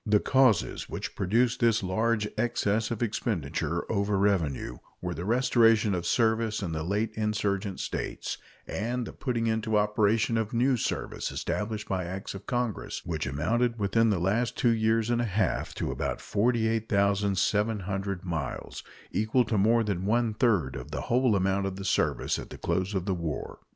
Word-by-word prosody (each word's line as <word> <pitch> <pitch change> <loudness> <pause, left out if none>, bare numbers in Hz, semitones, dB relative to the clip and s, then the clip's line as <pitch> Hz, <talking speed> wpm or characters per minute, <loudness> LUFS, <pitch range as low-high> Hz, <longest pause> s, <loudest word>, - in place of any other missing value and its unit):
The 105 -1 +3
causes 130 -8 +2
which - - -5
produced 115 +6 +1
this 115 -3 +3
large 110 +3 +1
excess 110 -2 0
of 115 0 -2
expenditure 100 - -2
over 100 0 0
revenue 85 -11 0 0.2
were 90 -1 -3
the 85 +2 -5
restoration 115 -2 +4
of 85 -2 -2
service 110 0 +1
in 85 - -3
the 80 -1 -2
late 105 +6 -1
insurgent 105 -2 -1
States - - -4 0.3
and 120 +4 -2
the - - -8
putting 120 -3 -2
into 110 -1 +1
operation 105 +2 +2
of 110 0 -3
new 130 +3 +3
service 120 - -3
established 105 0 -3
by 95 -2 -1
acts 95 +3 -5
of 100 0 -10
Congress, 120 -5 -2
which 80 -4 -2
amounted 115 - 0
within 110 +2 +2
the 100 - +2
last 105 +7 0
two 120 -2 +3
years 110 +1 +1
and 120 0 +2
a - - 0
half 105 -2 -1
to - - -2
about - - -2
48,700 100 -3 0
miles 80 -7 -4 0.3
equal 110 +5 +2
to 110 - -1
more 115 +3 +4
than 100 -3 -2
one 115 0 +2
third 105 - +1
of - - -7
the - - -4
whole 125 -2 +2
amount 95 +1 +1
of 95 - -4
the 95 0 -6
service - - +1
at - - -8
the - - -9
close 95 +2 -1
of 90 -2 -1
the 100 - 0
war. 85 -5 -4
105 Hz, 170 wpm, -28 LUFS, 95-115 Hz, 0.3 s, restoration